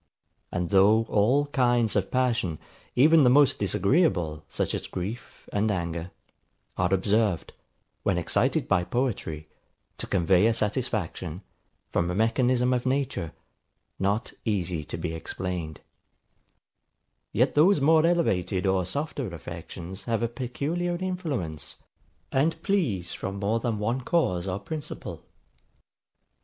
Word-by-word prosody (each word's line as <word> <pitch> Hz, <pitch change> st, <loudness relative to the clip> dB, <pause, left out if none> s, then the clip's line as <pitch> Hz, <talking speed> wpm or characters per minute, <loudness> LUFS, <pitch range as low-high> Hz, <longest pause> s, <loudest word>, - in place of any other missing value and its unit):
And 90 Hz, -2 st, -2 dB
though 105 Hz, +3 st, +5 dB
all 125 Hz, +8 st, +3 dB
kinds 120 Hz, -5 st, +2 dB
of 95 Hz, -2 st, +1 dB
passion, 115 Hz, -10 st, 0 dB, 0.4 s
even 155 Hz, +4 st, +6 dB
the 125 Hz, -, +6 dB
most 140 Hz, +1 st, +5 dB
disagreeable, 95 Hz, -, +1 dB
such -, -, -2 dB
as -, -, -3 dB
grief 105 Hz, +7 st, -6 dB
and 105 Hz, +2 st, +1 dB
anger, 85 Hz, -3 st, -2 dB, 0.7 s
are 90 Hz, 0 st, 0 dB
observed, 100 Hz, -1 st, +1 dB, 0.5 s
when 95 Hz, -3 st, +1 dB
excited 85 Hz, -, +1 dB
by 95 Hz, -3 st, +2 dB
poetry, 95 Hz, -, -2 dB, 0.5 s
to -, -, -3 dB
convey 95 Hz, +2 st, +3 dB
a 115 Hz, -, +2 dB
satisfaction, 105 Hz, -, -2 dB, 0.5 s
from 85 Hz, -, +1 dB
a 90 Hz, -, -2 dB
mechanism 125 Hz, +3 st, +2 dB
of 125 Hz, 0 st, -1 dB
nature, 130 Hz, -, -1 dB, 0.7 s
not 100 Hz, +5 st, 0 dB
easy 90 Hz, -7 st, -1 dB
to 75 Hz, -, -5 dB
be 80 Hz, 0 st, -3 dB
explained: 80 Hz, -1 st, -5 dB, 1.5 s
Yet 125 Hz, +6 st, +2 dB
those 160 Hz, +4 st, +5 dB
more 155 Hz, +3 st, +5 dB
elevated 100 Hz, -, +1 dB
or 95 Hz, -2 st, +1 dB
softer 145 Hz, +2 st, -3 dB
affections 90 Hz, +2 st, -8 dB
have 115 Hz, 0 st, 0 dB
a -, -, +2 dB
peculiar 145 Hz, +9 st, -2 dB
influence, 150 Hz, -, -3 dB, 0.6 s
and 160 Hz, +5 st, +1 dB
please 120 Hz, -, 0 dB
from 95 Hz, -, -4 dB
more 105 Hz, +3 st, 0 dB
than 115 Hz, -2 st, -1 dB
one 115 Hz, +5 st, -1 dB
cause 100 Hz, -, +1 dB
or 95 Hz, 0 st, -1 dB
principle. 150 Hz, +7 st, -6 dB
105 Hz, 125 wpm, -27 LUFS, 90-130 Hz, 1.5 s, even